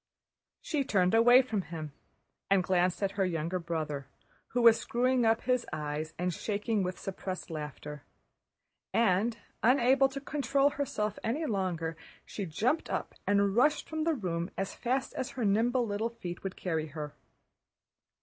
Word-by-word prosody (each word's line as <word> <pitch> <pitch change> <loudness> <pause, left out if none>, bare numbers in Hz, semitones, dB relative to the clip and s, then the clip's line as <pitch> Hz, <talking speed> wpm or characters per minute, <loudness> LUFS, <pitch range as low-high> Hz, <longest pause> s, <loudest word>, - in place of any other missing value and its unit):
She 295 -4 -1
turned 185 -6 +2
away 245 +3 +7
from 220 -5 -1
him 155 -3 -7 0.6
and 195 -2 +4
glanced 180 +1 +1
at 195 - +1
her - - +5
younger 170 0 -1
brother, 155 -5 -3 0.4
who 245 0 0
was 230 -1 +8
screwing 250 0 +1
up 225 0 +3
his 250 -1 +1
eyes 155 +1 -4
and 180 0 -1
shaking 210 +3 -1
with 180 0 -2
suppressed 185 -2 -5
laughter, 150 -1 -6 0.9
and 225 +1 +3 0.2
unable 260 +2 +5
to 275 +1 -5
control 280 0 +1
herself 215 -8 -2
any 285 +9 -1
longer, 180 - -1 0.3
she 200 -3 -5
jumped 235 - 0
up - - -3
and 200 -1 +3
rushed 295 +6 +3
from 315 0 -2
the 325 0 +2
room 175 -6 -2
as 195 - -2
fast 260 +2 -1
as 260 - -3
her 250 -4 -3
nimble 235 +5 +2
little 215 +2 -1
feet 185 -7 -7
would 195 -1 -4
carry 160 -4 -2
her. 150 -1 -6
200 Hz, 155 wpm, -31 LUFS, 175-245 Hz, 0.9 s, was